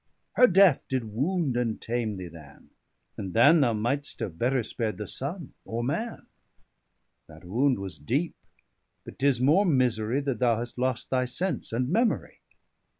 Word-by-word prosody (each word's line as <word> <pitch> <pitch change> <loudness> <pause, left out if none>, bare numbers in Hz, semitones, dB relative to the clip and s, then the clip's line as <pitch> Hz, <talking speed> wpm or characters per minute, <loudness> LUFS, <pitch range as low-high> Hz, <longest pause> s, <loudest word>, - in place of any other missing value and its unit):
Her 250 - +6
death 190 - +4
did 130 -2 -1
wound 145 - 0
and 120 -3 -1
tame 115 -2 -2
thee 95 -2 -7
than, 80 -4 -15 0.5
and 95 -2 -6
than 145 +8 +6
25 - - +3
Thou 120 -4 +3
might'st 135 +7 -2
have 95 -8 -5
better 125 0 +1
spar'd 110 0 -3
the 105 - -5
Sunne, 150 - -5
or 115 +1 -4
Man. 215 - -3 1.0
That 80 +2 -15
wound 125 +9 +1
was 95 -2 -5
deep, 140 - -1 0.7
but - - -11
'tis 135 -3 +2
more 150 +10 +4
misery, 125 - +1
That 135 -5 -2
thou 120 -3 +3
hast 120 +1 -6
lost 130 -1 -1
thy 130 -1 +2
sense 180 +10 -3
and 125 +2 -1
memory. 225 - 0
125 Hz, 165 wpm, -27 LUFS, 110-145 Hz, 1.0 s, Her